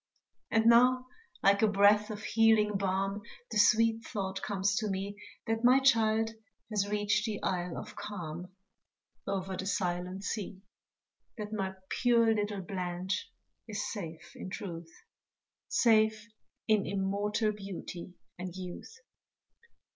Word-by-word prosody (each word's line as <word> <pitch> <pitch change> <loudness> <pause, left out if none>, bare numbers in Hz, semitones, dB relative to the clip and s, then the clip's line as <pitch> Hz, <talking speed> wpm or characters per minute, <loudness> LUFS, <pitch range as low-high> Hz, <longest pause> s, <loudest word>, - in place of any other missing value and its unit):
And 225 0 +2
now 250 +2 +6 0.4
like 200 0 +5
a 220 - +5
breath 205 +1 +4
of 210 0 -6
healing 220 -2 +4
balm 195 +1 -1 0.3
The 215 - +1
sweet 225 +2 +4
thought 195 -3 -4
comes 200 -1 0
to 215 - 0
me, 195 +1 -3 0.3
That 225 0 -1
my 250 +2 +7
child 225 -4 +3 0.4
has 205 -1 0
reached 210 +1 +1
the 210 -2 -3
Isle 180 -2 -1
of 215 0 -8
Calm, 175 -3 -6 0.8
Over 190 -1 -2
the 190 - -4
silent 180 0 -2
sea 200 -3 -4 0.7
That 210 0 -5
my 190 -2 -2
pure 235 -2 +3
little 205 -2 -2
Blanche 180 0 -3 0.4
is 210 -1 -3
safe 165 -6 -7
in - - -7
truth, 170 -4 -6 0.8
Safe 220 -1 +3 0.4
in 215 -2 +3
immortal 200 +3 0
beauty 190 -3 -7 0.2
and 180 -1 -5
youth. 185 - -8
205 Hz, 125 wpm, -31 LUFS, 190-220 Hz, 0.8 s, my